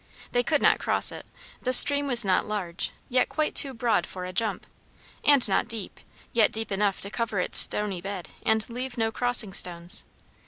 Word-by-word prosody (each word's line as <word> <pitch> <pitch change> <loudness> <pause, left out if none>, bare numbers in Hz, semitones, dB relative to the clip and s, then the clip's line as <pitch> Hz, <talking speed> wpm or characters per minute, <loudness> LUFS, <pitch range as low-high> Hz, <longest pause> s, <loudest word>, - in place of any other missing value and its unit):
They 245 - +1
could 295 +3 -1
not - - +3
cross - - +1
it. - - -11 0.3
The 255 - -2
stream 285 +2 +6
was 240 -4 +1
not 185 -1 0
large, 190 -5 -4 0.2
yet 250 0 0
quite 310 -1 -2
too 275 - +5
broad 230 -7 -1
for 185 -1 -7
a 185 - -8
jump; 210 -1 -2 0.6
and 285 -5 +3
not 195 +4 0
deep, 225 -4 -4 0.3
yet 225 -2 +3
deep 225 0 -3
enough 200 0 -1
to 200 - -4
cover 225 -4 -3
its 180 - +5
stony 200 -4 +3
bed 195 -1 -7
and 220 -1 0
leave 250 +1 -7
no 225 -1 -1
crossing 235 -4 +2
stones. 175 +2 0
220 Hz, 190 wpm, -25 LUFS, 195-245 Hz, 0.6 s, stream